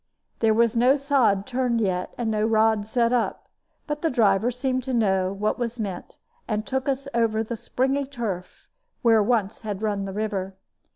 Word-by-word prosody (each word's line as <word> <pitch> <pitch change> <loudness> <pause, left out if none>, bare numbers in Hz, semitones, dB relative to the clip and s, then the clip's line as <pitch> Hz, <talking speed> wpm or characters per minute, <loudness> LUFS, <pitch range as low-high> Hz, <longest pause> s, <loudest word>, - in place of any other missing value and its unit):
There 220 -1 +3
was 230 0 +3
no 250 +4 +5
sod 265 -9 +2
turned 250 -2 0
yet 185 -4 -1
and 230 -2 -1
no 215 -1 0
rod 220 -1 +2
set 235 +1 +1
up; 245 - -1 0.4
but 295 -1 -4
the 325 - +1
driver 220 -3 +3
seemed 255 +1 -1
to 260 -2 -1
know 190 -4 +2
what 210 +4 -1
was 240 0 -3
meant, 195 -5 -5 0.3
and 215 0 -2
took 265 0 -2
us 275 0 -2
over 225 -2 +1
the 235 +2 -4
springy 265 +4 -1
turf 220 -10 -5 0.4
where 225 -2 +5
once 210 -2 0
had 210 -2 -5
run 205 -2 -1
the 195 - -5
river. 195 -2 -3
225 Hz, 180 wpm, -24 LUFS, 205-250 Hz, 0.4 s, no